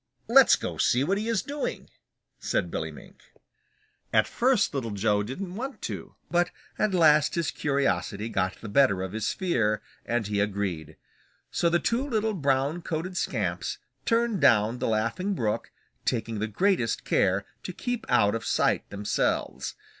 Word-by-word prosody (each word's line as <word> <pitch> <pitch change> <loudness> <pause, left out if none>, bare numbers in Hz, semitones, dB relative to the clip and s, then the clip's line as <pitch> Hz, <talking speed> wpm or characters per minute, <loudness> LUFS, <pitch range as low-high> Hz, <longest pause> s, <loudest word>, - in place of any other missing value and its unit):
"Let's - - +7
go - - -5
see 125 +2 +3
what 195 +7 +1
he 215 - -3
is 230 -4 +1
doing," 285 0 -4 0.5
said - - -1
Billy - - -3
Mink. - - -14 0.9
At - - +4
first 250 -7 +2
Little 130 -5 -2
Joe 105 0 +1
didn't 175 - -5
want 260 +7 -5
to, - - -6 0.2
but 175 0 +3 0.3
at 205 -3 +2
last 155 -3 +5
his 170 -2 0
curiosity 135 -7 0
got 95 -4 -1
the 115 - -7
better 100 -5 +3
of 95 - -4
his 110 +1 -1
fear, 115 - 0 0.2
and 120 -2 -1
he 105 0 -1
agreed. 100 -6 -2 0.5
So 170 - +2
the 170 - +3
two 235 +8 0
little 220 -5 0
brown 140 0 0
coated 170 +3 -4
scamps - - -2 0.3
turned 230 -5 +1
down 115 -3 +4
the - - -1
Laughing 115 - 0
Brook, 110 -8 -1 0.3
taking 115 -2 -1
the 110 - -1
greatest 190 - +1
care - - +2 0.2
to - - -5
keep 245 -2 -3
out 105 -5 +4
of 115 -1 -3
sight - - +1
themselves. 100 0 -1
140 Hz, 160 wpm, -27 LUFS, -, 0.9 s, Let's